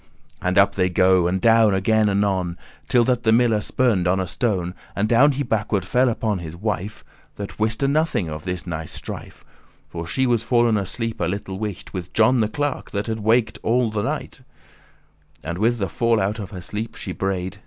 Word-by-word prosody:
And 90 0 0
up 100 0 +5
they 90 -2 +1
go, 90 -1 +4
and 95 +2 0
down 110 -1 +5
again 110 +2 +2
anon, 95 -3 0 0.3
Till 120 - +4
that 125 0 +1
the 110 - +2
miller 115 -2 +3
spurned* 105 -7 +1
on 95 +2 +2
a 95 - 0
stone, 90 -2 -1
*stumbled - - -9 0.2
And 105 +2 +1
down 125 +6 +5
he 140 +2 -2
backward 105 -5 -1
fell 125 +5 +3
upon 110 -3 -1
his 80 -1 -7
wife, 105 +1 -4 0.3
That 100 +1 -7
wiste 110 +4 0
nothing 145 - +1
of 75 -1 -6
this 90 -1 -4
nice 80 -3 -5
strife: - - -9 0.4
For 85 0 -6
she 130 +9 0
was 120 -3 +2
fall'n 120 -2 +3
asleep 115 +3 -3
a - - +2
little 95 +1 -4
wight* 105 -4 -5
*while 95 - -2
With 90 0 -11
John 120 +3 +4
the 110 -2 +1
clerk, 145 +4 -3
that 100 +2 -3
waked 110 +2 +2
had - - -34
all 120 -1 +2
night: 105 -1 -3 1.0
And 85 +4 -4
with 115 +3 +2
the 100 -3 -1
fall 115 +5 +1
out 100 +3 -1
of 100 -3 -6
her 90 -3 -8
sleep 105 +5 -5
she 95 - -6
braid*. 95 +1 -3
105 Hz, 205 wpm, -22 LUFS, 95-115 Hz, 1.0 s, up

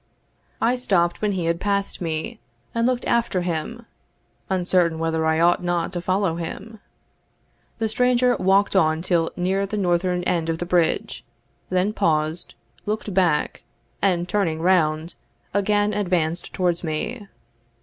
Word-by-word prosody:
I 245 +2 +2
stopped 175 -8 +1
when 210 -1 +1
he 180 -3 -2
had 170 0 0
passed 200 -2 -1
me, 170 +7 -3 0.3
and 230 +1 +1
looked 255 -1 -1
after 235 -6 +1
him, 175 +7 -4 0.6
uncertain 180 -3 +2
whether 160 0 0
I 160 0 +2
ought 175 +1 +3
not 175 0 -1
to 175 - -3
follow 185 -2 0
him. 200 +6 -7 1.0
The 225 - 0
stranger 250 +2 +2
walked 195 +2 +2
on 160 -3 +3
till 170 -3 +1
near 190 +2 0
the 210 - -4
northern 180 -1 +1
end 170 -2 0
of 165 - 0
the 175 - -4
bridge, 175 -2 0 0.5
then 185 +3 +1
paused, 155 -2 0 0.3
looked 210 -1 -2
back, 175 -5 +1 0.4
and 180 -3 +1
turning 180 -6 0
round, 165 -2 +2 0.4
again 205 +1 +1
advanced 175 -4 -1
towards 175 -2 0
me. 200 +8 -4
180 Hz, 140 wpm, -23 LUFS, 165-205 Hz, 1.0 s, ought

